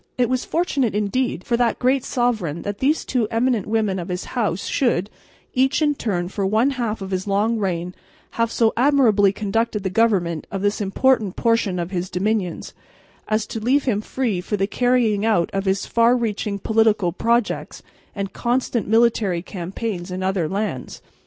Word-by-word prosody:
It 245 -2 +2
was 255 -1 0
fortunate 280 - 0
indeed 210 -1 -1
for 240 - 0
that 240 -1 +1
great 255 +1 +2
sovereign 220 - -1
that 205 0 -4
these 295 +4 +1
two 240 -4 0
eminent 230 -2 0
women 215 -3 0
of 175 - -5
his 180 0 -4
house 210 -7 -1
should, 215 -7 0 0.4
each 265 +1 +2
in 300 -2 +2
turn 185 -10 -2
for 200 +2 -3
one 220 +8 +2
half 230 -6 -3
of 190 - -7
his 185 +1 -2
long 210 +3 +1
reign, 180 -3 -2 0.4
have 230 0 0
so 225 -2 +2
admirably 235 -7 +4
conducted 210 +1 -1
the 190 - -2
government 185 -7 +1
of 195 0 -4
this 205 +1 0
important 210 0 +1
portion 230 -5 +1
of 175 +1 -3
his 180 -1 -3
dominions, 190 -2 -2 0.5
as 215 0 0
to 225 - -5
leave 260 +6 +2
him 215 -6 0
free 220 -5 -2
for 210 +3 -2
the 195 - +1
carrying 235 -2 +1
out 210 -7 +2
of 195 0 -1
his 190 +1 0
far 235 +2 +3
reaching 210 -3 -2
political 215 -3 +2
projects 235 +5 -1 0.3
and 195 -2 -4
constant 240 -2 -1
military 220 -5 +2
campaigns 190 0 -5
in 185 +1 -4
other 190 -4 0
lands. 195 -10 -4
215 Hz, 175 wpm, -22 LUFS, 190-235 Hz, 0.5 s, admirably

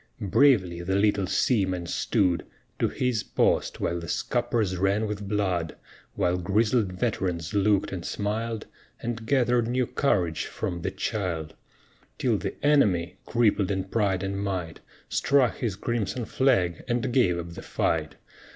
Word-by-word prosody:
Bravely 95 -12 +4
the 95 +2 -1
little 100 -1 +2
seaman 95 -6 +1
stood 90 0 +1 0.4
To - - +3
his 125 -4 0
post - - +1
while 85 +1 -1
the 85 - -7
scuppers 105 +3 0
ran 100 +4 +1
with 105 -1 -4
blood, 95 -6 -1 0.4
While 90 -2 +1
grizzled 105 +3 +1
veterans 90 -5 -2
looked 100 -1 +2
and 90 -3 -4
smiled 110 +3 -3 0.3
And 115 -1 -4
gathered 125 -3 +2
new 125 +1 +1
courage 90 - 0
from 85 -1 -4
the - - -1
child; 85 -6 -3 0.6
Till - - +1
the - - -4
enemy, 95 - +3
crippled 110 -5 +2
in 95 -2 0
pride 100 -3 0
and 100 0 -2
might, 90 -5 -3 0.3
Struck 140 -3 +2
his 115 -6 -2
crimson 115 +1 -2
flag 95 - +1
and 120 +1 -1
gave 95 -10 +3
up 85 0 -6
the - - -8
fight. 75 -4 -1
100 Hz, 140 wpm, -26 LUFS, 90-115 Hz, 0.6 s, Bravely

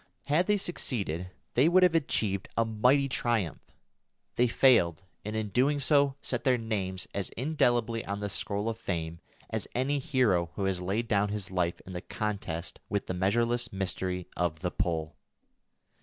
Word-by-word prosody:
Had 155 - +2
they 210 0 +3
succeeded, 100 - -2 0.2
they 135 +7 +5
would 185 +1 +5
have 180 -2 +5
achieved 110 - 0
a 115 - +3
mighty 125 +6 +3
triumph; 120 - -1 0.7
they 125 - +4
failed, 115 - +4 0.2
and 105 +1 -4
in 110 -1 -2
doing 140 +7 +2
so 140 -1 +3
set 125 - -1
their 130 -2 +3
names 100 -5 -2
as 100 -1 -2
indelibly 120 -5 +1
on 100 +1 -3
the 105 - -2
scroll 100 +1 -3
of 115 0 -3
Fame 85 -6 -3 0.3
as - - -2
any 135 +3 +1
hero 120 - +2
who 100 - -1
has 95 -2 -1
laid 100 +6 -1
down 100 -1 +2
his 100 -3 -4
life 90 -2 0
in 95 - -10
the 90 - -4
contest 100 -6 -4
with 100 -2 -1
the - - -3
measureless 115 +6 +1
mystery 95 -2 -2
of 80 -2 -1
the 90 - -1
Pole. 80 -2 -2
105 Hz, 170 wpm, -29 LUFS, 95-125 Hz, 0.7 s, they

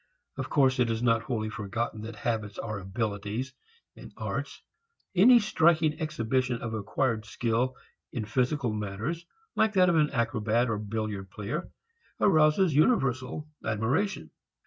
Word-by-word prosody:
Of - - -4
course 130 -3 +3
it 120 -2 +3
is 115 +1 -1
not 115 -2 +3
wholly 110 -4 -3
forgotten 110 +1 -3
that 110 +1 -7
habits 105 -1 -3
are 110 -2 -4
abilities, 105 +5 -3 0.6
arts. - - -4 0.5
Any 225 +7 +7
striking 165 -7 +3
exhibition 125 -4 0
of 115 -1 -5
acquired 110 +2 -1
skill 120 +3 -1 0.4
in 115 -3 -3
physical 125 +2 0
matters, 110 +12 -4 0.3
like 220 -1 +3
that 185 -2 +5
of 170 - +3
an 150 -1 +4
acrobat 115 0 +1
or 105 - -1
billiard 105 -2 -4
player, 110 - -4 0.5
arouses 155 -1 +4
universal 135 - +1 0.2
admiration. 110 - -1
120 Hz, 130 wpm, -28 LUFS, 110-150 Hz, 0.6 s, Any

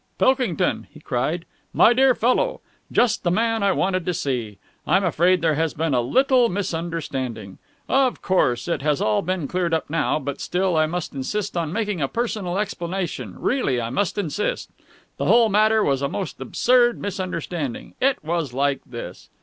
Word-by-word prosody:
"Pilkington!" 255 - +1
he 155 - -14
cried. 150 +5 -2 0.3
"My 235 - +6
dear 260 0 +4
fellow! 375 - +1 0.3
Just 235 -3 +2
the 175 - 0
man 225 +4 +1
I 200 0 +3
wanted 185 -1 0
to 180 - 0
see! 120 -9 -3 0.3
I'm 190 +5 +3
afraid 180 0 +2
there 160 -2 +3
has 160 +1 -1
been 160 -2 0
a 125 - +3
little 250 - +3
misunderstanding. 160 - -4 0.3
Of 265 -2 +2
course, 125 -10 +1
it 170 - -1
has 150 0 +1
all 105 -1 +1
been 180 -4 -2
cleared 175 -1 0
up 160 - -4
now, 165 -1 +1
but 140 -2 -5
still 185 -1 0
I 155 0 +3
must 175 +2 -4
insist 195 +10 -3
on 165 -3 -1
making 210 -3 -2
a 135 - +1
personal 210 - -2
explanation; 175 - -3
really, 245 - 0
I 115 0 -3
must 185 +9 -1
insist. 205 +1 -2 0.5
The - - -2
whole 230 -1 +5
matter 215 +1 +3
was 140 -5 +1
a 140 - 0
most 195 - -5
absurd 240 -1 +3
misunderstanding. 175 -8 -4
It 270 - +2
was 160 -5 -2
like 140 +1 0
this...." 120 -2 -8
175 Hz, 175 wpm, -23 LUFS, 145-210 Hz, 0.5 s, My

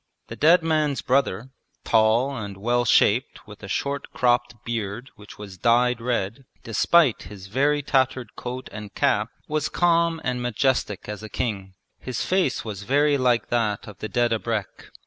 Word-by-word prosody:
The - - -6
dead 165 +3 +5
man's 155 -4 0
brother, 130 -2 0 0.3
tall 115 +5 +3
and 100 -4 -6
well 120 +4 0
shaped 115 +3 +2
with 105 -1 -13
a 100 - -8
short 140 +7 -3
cropped 120 -1 +1
beard 115 +2 -4
which 105 -1 -14
was 100 -3 -10
dyed 120 +2 +3
red, 115 0 -2 0.2
despite 135 +4 +3
his 100 -2 -10
very 140 +8 +1
tattered 130 -2 0
coat 125 +1 -6
and 105 -1 -9
cap 105 +2 +1 0.2
was 155 0 -1
calm 170 -1 +2
and 125 0 -2
majestic 120 -4 -1
as 105 -1 -6
a 110 - -8
king. 100 -5 -4 0.2
His 125 -2 -4
face 185 -11 0
was 105 -3 -6
very 145 +5 +2
like 120 -3 +1
that 110 -4 -1
of 105 -3 -11
the 110 - -5
dead 120 -1 +1
abrek. 110 -3 -3
120 Hz, 165 wpm, -24 LUFS, 105-135 Hz, 0.3 s, dead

